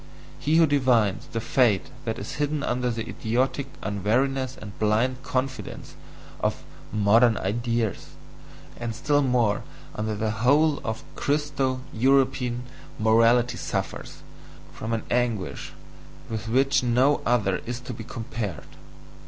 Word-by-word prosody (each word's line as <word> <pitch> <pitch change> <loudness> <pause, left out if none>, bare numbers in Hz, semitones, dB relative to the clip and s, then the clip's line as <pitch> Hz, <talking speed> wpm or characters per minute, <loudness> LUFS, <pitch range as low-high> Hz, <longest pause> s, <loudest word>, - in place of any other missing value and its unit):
he 150 +3 +1
who 165 0 +7
divines 125 -9 +2
the 115 - -1
fate 115 -3 +2
that 115 -1 -2
is - - -6
hidden 145 0 0
under 125 0 0
the 115 -1 -3
idiotic 130 +4 -1 0.2
unwariness 125 +6 0
and 105 -2 -10
blind 115 +4 +1
confidence 130 -5 -4 0.4
of - - -1 0.3
"modern 110 +3 +4
ideas," 115 +1 -1 0.7
and 120 -2 -4
still 145 +3 +2
more 120 -6 +2 0.3
under 110 0 -2
the 110 +1 -1
whole 140 +7 +3
of 110 0 -4
Christo 140 -3 0
European 130 0 +2 0.3
morality 115 +2 +4
suffers - - -4 0.5
from 110 - -5
an 115 -1 -1
anguish 120 -6 -1 0.6
with 110 0 -4
which 135 +3 +3
no 125 +4 +3
other 105 -6 +1
is 120 0 -3
to 125 0 -6
be 110 - -7
compared. 115 -5 -5
120 Hz, 125 wpm, -25 LUFS, 110-130 Hz, 0.7 s, who